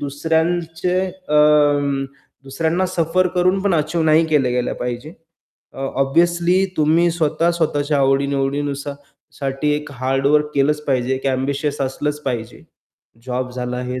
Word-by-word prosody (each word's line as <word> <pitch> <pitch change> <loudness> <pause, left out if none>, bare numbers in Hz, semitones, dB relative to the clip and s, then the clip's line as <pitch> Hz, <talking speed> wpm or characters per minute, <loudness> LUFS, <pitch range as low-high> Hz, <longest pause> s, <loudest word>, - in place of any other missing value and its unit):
दुसऱ्यांचे 165 +4 -1 0.3
अं, 145 -2 +3 0.4
दुसऱ्यांना 160 +7 -1
सफर 180 0 +1
करून 185 +2 +2
पण 195 -4 +1
अचीव्ह 160 +1 0
नाही 155 +1 +5
केले 145 -5 +2
गेलं 125 0 -1
पाहिजे, 125 +4 -4 0.6
अ - - -13 0.2
ऑब्वियसली 175 +5 +2
तुम्ही 160 +3 +3
स्वतः 165 0 +1
स्वतःच्या 150 -3 0
आवडी-निवडीनुसार 140 +1 0 0.4
साठी 140 +1 -1
एक 150 0 -7
हार्ड 135 +2 -1
वर्क 150 +1 +3
केलंच 150 +2 +2
पाहिजे, 130 -1 0
एक 135 +1 -5
एम्बिशियस 140 +2 -1
असलंच 145 +2 -2
पाहिजे. 120 -4 -4 0.6
जॉब 125 0 -3
झाला, 125 0 -4
हे 125 0 -4
145 Hz, 130 wpm, -20 LUFS, 135-165 Hz, 0.6 s, नाही